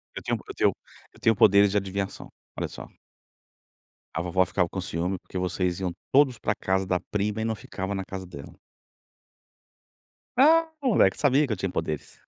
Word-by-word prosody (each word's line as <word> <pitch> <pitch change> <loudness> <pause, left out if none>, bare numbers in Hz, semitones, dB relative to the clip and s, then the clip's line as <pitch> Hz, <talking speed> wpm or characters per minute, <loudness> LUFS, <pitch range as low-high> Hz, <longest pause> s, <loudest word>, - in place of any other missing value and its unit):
Eu - - -6
tenho - - 0
eu - - -6
tenho - - +2 0.4
eu - - -19
tenho 115 - +3
poderes 100 -1 +6
de 105 - +1
adivinhação, 100 0 -3 0.3
olha - - -2
só. - - -10 1.3
A 85 - -1
vovó 90 +1 +2
ficava 90 -1 0
com 95 - -4
ciúme 90 +2 -2
porque 95 - -8
vocês 90 0 -1
iam 95 -2 -1 0.2
todos 135 -3 +4
pra 105 - 0
casa 95 0 0
da 90 -1 0
prima 105 +1 -1
e - - -1
não 110 0 -1
ficava 95 -1 -5
na 95 - -3
casa 95 0 -6
dela. 80 -6 -11 1.8
Ah, 325 +4 +6
moleque! 250 -6 +4
Sabia 145 0 +3
que 110 - -1
eu - - -4
tinha 95 0 -2
poderes. 80 -3 -4
95 Hz, 180 wpm, -26 LUFS, 90-110 Hz, 1.8 s, poderes